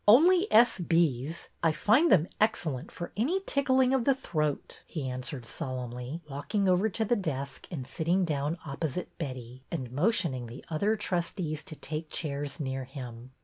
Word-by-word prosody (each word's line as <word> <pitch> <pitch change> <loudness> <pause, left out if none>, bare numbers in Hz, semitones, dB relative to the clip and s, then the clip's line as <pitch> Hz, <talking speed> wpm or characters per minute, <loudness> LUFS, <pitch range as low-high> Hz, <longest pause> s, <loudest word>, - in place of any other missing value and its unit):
Only 350 - +7
S.B.'s. 165 - +3
I 165 - +4
find 225 - +4
them 170 -2 +5
excellent 160 - 0
for 175 - -6
any 310 - +1
tickling 265 -6 +3
of 265 -3 +3
the 275 +2 +4
throat," 155 - -2
he 150 -5 -4
answered 125 0 -5
solemnly, 125 +4 -4
walking 170 +8 -1
over 185 +4 +4
to 220 +2 -1
the 240 +3 +3
desk 140 - -4
and 145 -8 -5
sitting 170 +8 +1
down 150 +1 -1
op 140 -2 -6
posite 160 +2 -2
Betty, 130 -4 -6
and 130 -8 -4
motioning 145 - +1
the 120 +4 -10
other 200 +8 +2
trustees 170 -5 -2
to 170 -5 -7
take 155 +1 -5
chairs 145 -1 -3
near 135 -2 -2
him. 125 -2 -8
160 Hz, 160 wpm, -30 LUFS, 135-205 Hz, -, Only